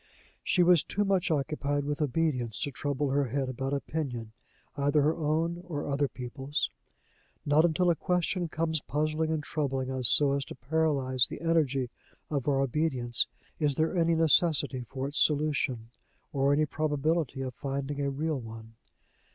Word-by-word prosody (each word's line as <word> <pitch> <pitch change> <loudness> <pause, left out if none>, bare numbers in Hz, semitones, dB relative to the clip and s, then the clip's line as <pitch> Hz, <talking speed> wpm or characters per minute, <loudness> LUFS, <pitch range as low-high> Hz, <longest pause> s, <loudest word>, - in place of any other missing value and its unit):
She 180 - +3
was 175 -2 +6
too 205 +1 -1
much 190 -2 +1
occupied 145 -1 0
with 145 +1 -2
obedience 135 -6 0
to 145 - -1
trouble 140 +1 -2
her 140 +1 +2
head 135 +2 -2
about 135 +1 -3
opinion, 135 -6 -3 0.4
either 145 +1 +2
her 155 +2 +2
own 165 +2 0
or 160 -5 -4
other 140 0 +1
people's. 135 +4 -3 0.7
Not 150 +3 +5
until 175 +2 +3
a - - +1
question 180 +1 0
comes 160 -1 -1
puzzling 155 +2 -1
and 160 -2 -1
troubling 135 -4 -2
us 130 -3 +3
so 140 -2 +4
as 140 0 0
to - - -9
paralyze 135 -2 +1
the - - -8
energy 140 -7 +1 0.4
of 140 -3 -1
our 135 -2 +3
obedience 130 -3 0 0.3
is 145 -3 +1
there 160 +5 +1
any 170 -1 +3
necessity 155 -4 +3
for 135 0 -3
its 145 - -2
solution, 145 -6 +1 0.4
or 140 0 +2
any 150 +2 +3
probability 150 -1 -1
of 130 -1 -4
finding 140 +2 -3
a 140 - 0
real 150 +1 -1
one. 115 -1 -10
145 Hz, 160 wpm, -29 LUFS, 135-160 Hz, 0.7 s, was